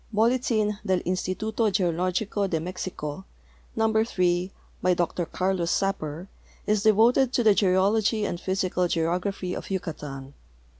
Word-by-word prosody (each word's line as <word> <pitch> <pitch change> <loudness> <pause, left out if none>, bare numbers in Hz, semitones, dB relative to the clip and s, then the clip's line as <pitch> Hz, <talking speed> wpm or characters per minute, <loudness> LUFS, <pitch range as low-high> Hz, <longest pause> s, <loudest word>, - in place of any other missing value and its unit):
Boldin 220 -2 +1
del 190 -3 +1
LndiHdo 205 +5 -1
Geologico 185 +2 0
de 165 - 0
Mexico, 175 -2 -5 0.5
number 220 0 +2
3, 180 -4 0 0.3
by 180 0 +3
Dr 175 0 -1
Carlos 185 -2 -1
Sapper, 175 -4 -1 0.4
is 210 -1 +1
devoted 230 +4 +4
to 240 - +2
the 215 -2 +6
geology 205 +3 +2
and 175 -3 -4
physical 185 -1 0
geography 180 +3 -1
of - - -6
Yucatan. 150 -7 -5
190 Hz, 120 wpm, -26 LUFS, 175-215 Hz, 0.5 s, the